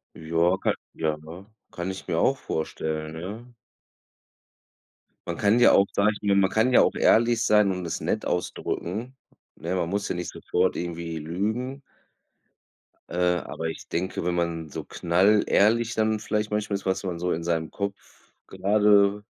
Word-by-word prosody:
Jo, 85 +3 +1
ka - - +2 0.2
ja, 80 -1 -1
ne? 85 +5 -11 0.3
Kann 90 +2 -4
ich 95 - -9
mir - - 0
auch - - +3
vorstellen, 80 0 -4
ja? 110 +8 -8 1.7
Man - - -3
kann 105 +4 +3
ja - - +7
auch, 100 - +6
sage 105 +1 +3
ich - - -11
mir 100 -1 +2
man 95 -1 +4
kann 115 +4 +2
ja - - +7
auch - - +2
ehrlich 115 0 +3
sein 105 -2 +4
und 90 -1 -4
es 80 - -3
nett - - -1
ausdrücken, 110 +9 -3 0.4
ne? 85 +3 -3
Man 85 -2 -1
muss 100 +2 -1
ja - - -2
nicht 90 0 -4
sofort - - 0
irgendwie 85 -1 -4
lügen 110 - -3 1.3
äh, 90 0 +1
aber 80 - -6
ich 80 - -8
denke, 90 0 -2
wenn 90 0 0
man 85 -2 -2
so - - -6
knallehrlich 105 +5 +2
dann 110 0 +1
vielleicht 105 0 -2
manchmal 105 -1 -1
ist, 100 - -5
was 95 +1 0
man 90 -3 -4
so 90 +1 -1
in 85 - -2
seinem 80 -2 -1
Kopf 100 0 -3 0.5
grade 100 +1 +3
95 Hz, 165 wpm, -25 LUFS, 85-105 Hz, 1.7 s, ja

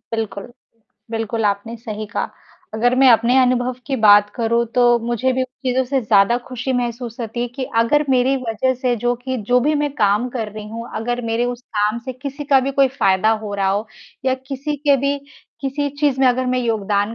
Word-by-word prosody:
बिल्कुल। 220 +1 -5 0.6
बिल्कुल, 225 0 -2
आपने 205 +3 -1
सही 215 -2 -6
कहा। - - -2 0.4
अगर 245 +3 +2
मैं 270 -1 +6
अपने 235 +3 +4
अनुभव 250 0 +2
की 270 -2 -1
बात 205 -2 +6
करूँ 235 0 +1
तो 245 -1 +4
मुझे 240 +3 -1
भी 260 0 0
उन - - 0 0.2
चीज़ों 255 +1 +1
से 265 +1 0
ज़्यादा 215 +1 +4
ख़ुशी 255 +1 -3
महसूस 240 -1 -3
होती 230 +1 -4
है 245 - -2
कि 260 +2 -5 0.2
अगर 295 +6 +2
मेरी 260 +1 +3
वजह 255 +1 -1
से 250 -1 0
जो 245 0 +2
कि 260 +1 -4
जो 250 0 +4
भी 300 +4 +1
मैं 290 - 0
काम 210 +4 +2
कर 225 -4 -3
रही 215 -1 -8
हूँ। 230 +2 -7
अगर 240 +2 -2
मेरे 230 +1 0
उस 245 - -10 0.2
काम 210 +3 +1
से 260 - -4
किसी 280 +3 -7
का 275 -2 +4
भी 270 +2 -2
कोई 275 -1 +4
फ़ायदा 190 +3 +3
हो 205 - -5
रहा 195 -1 0
हो, 205 +3 -1 0.4
या 260 0 +2
किसी 285 +2 -3
के 285 -1 +3
भी 280 +2 0 0.4
किसी 285 +1 -2
चीज़ 275 -3 +2
में 265 - +5
अगर 255 +1 +1
मैं 255 0 +1
योगदान 210 -2 0
245 Hz, 210 wpm, -20 LUFS, 225-260 Hz, 0.6 s, मैं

